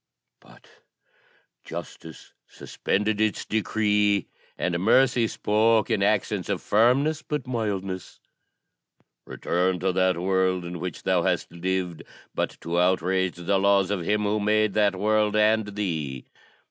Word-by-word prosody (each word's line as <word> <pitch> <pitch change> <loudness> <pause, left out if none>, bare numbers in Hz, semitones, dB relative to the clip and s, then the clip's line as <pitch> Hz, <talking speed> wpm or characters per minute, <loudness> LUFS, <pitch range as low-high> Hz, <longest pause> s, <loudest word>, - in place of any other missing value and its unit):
But - - -20 1.0
Justice 80 -1 -9
suspended 105 +1 -2
its 110 -1 0
decree, 105 -2 +1 0.3
and 85 -1 -1
Mercy 120 +3 +3
spoke 110 +2 +1
in 110 -3 +1
accents 105 -1 0
of 100 -3 -1
firmness, 130 +8 +2
but 150 -4 -4
mildness, 100 -7 -4 1.1
'Return 90 +1 -1
to 95 0 +1
that 95 -1 +1
world 95 0 0
in 85 0 -6
which 90 -1 -6
thou - - +2
hast - - -1
lived 90 0 -3 0.3
but - - -3
to 85 +1 -1
outrage 95 +1 +1
the 90 +3 0
laws 100 -1 +3
of 100 -3 -1
Him 105 +5 0
who 105 +1 0
made 105 0 +1
that 105 -2 +2
world 105 +2 +1
and 110 0 +3
thee. 80 -10 -3
100 Hz, 130 wpm, -25 LUFS, 90-110 Hz, 1.1 s, Mercy